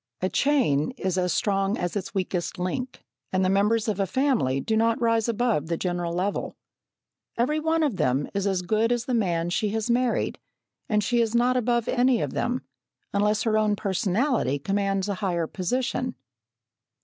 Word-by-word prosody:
A 185 - 0
chain 245 - +2
is 185 -4 -1
as 180 -1 +1
strong 195 0 +1
as 175 +2 -3
its 195 -3 -3
weakest 185 -1 -2
link, 240 +8 -4 0.3
and 185 0 +1
the 185 - +2
members 210 +3 +2
of 205 -2 -1
a 195 - +1
family 230 - +1
do 220 +10 -1
not 230 +1 +2
rise 230 -1 +2
above 230 -9 0
the 170 0 -1
general 175 -1 -2
level. 190 +3 -2 0.8
Every 295 +6 +1
one 320 +1 +1
of 270 -11 0
them 130 +3 +1
is 200 0 0
as 190 -2 0
good 220 +5 +1
as 240 -1 0
the 255 - -2
man 175 -6 0
she 210 +3 0
has 220 +2 0
married, 245 0 0 0.5
and 210 -2 +2
she 240 +3 +2
is 230 0 0
not 245 +2 +3
above 240 -1 +1
any 250 -1 +3
of - - -2
them, 250 +1 -1 0.5
unless 210 +1 +2
her 215 -2 +2
own 210 -1 +2
personality 195 - 0
commands 195 +4 -1
a 200 - -1
higher 175 -4 0
position. 250 +8 -2
210 Hz, 180 wpm, -25 LUFS, 185-240 Hz, 0.8 s, not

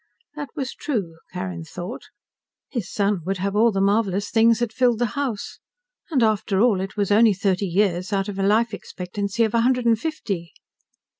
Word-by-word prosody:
That 290 -2 -5
was 270 -4 -3
true, 190 - -3
Carrin 180 -2 -5
thought. 180 +7 -7 0.7
His 235 -9 -4
son 200 -3 +1
would 195 0 0
have 195 +2 -2
all 225 +2 +5
the 195 - -1
marvelous 200 0 +1
things 230 0 +5
that 235 -2 -2
filled 245 -2 +3
the 240 - +1
house. 265 -7 -3 0.5
And 270 -8 +2
after 215 -3 +1
all, 215 -4 +3
it 195 +2 -6
was 205 -1 0
only 215 0 +5
thirty 195 0 0
years 185 +1 +1
out 195 0 0
of 200 -1 -5
a - - +1
life 220 +3 +3
expectancy 200 +3 -3
of 220 -1 0
a 230 - +3
hundred 250 0 +2
and 230 -2 +4
fifty. 200 - -4
205 Hz, 190 wpm, -23 LUFS, 195-230 Hz, 0.7 s, all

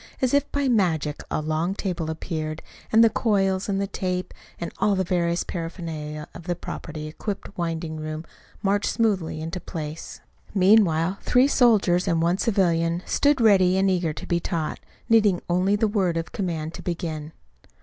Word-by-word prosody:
As 260 0 +1
if 285 0 +2
by 285 -1 0
magic 165 - +1
a 155 - -1
long 160 +5 -1
table 175 -6 -3
appeared, 160 -1 -4 0.3
and 225 +1 +7
the 230 - +6
coils 195 -4 +1
and 195 -1 0
the 200 - 0
tape, 185 -2 -3 0.3
and 170 - -4
all 205 - +3
the 190 - +1
various 170 -1 0
paraphernalia 160 -3 -5
of 170 - -10
a 175 - +1
properly 155 -2 -7
equipped 195 +6 -6
winding 165 -2 -3
room 155 +1 -5 0.4
marched 200 +1 +1
smoothly 190 -9 0
into 165 +3 -4
place. 155 -2 -7 0.4
Meanwhile 185 -3 +4
three 250 +2 +4
soldiers 205 -9 +3
and 165 -3 +2
one 170 +3 +1
civilian 170 -5 +1
stood 290 -1 +2
ready 190 -5 +5
and 190 0 +3
eager 175 -3 0
to 150 - -7
be 170 - +1
taught, 165 -2 -3 0.3
needing 210 -5 +4
only 180 +4 +2
the 215 +1 +2
word 190 -5 +1
of 165 - -4
command 165 -4 -3
to - - -8
begin. 160 -3 -4
180 Hz, 170 wpm, -24 LUFS, 160-200 Hz, 0.4 s, and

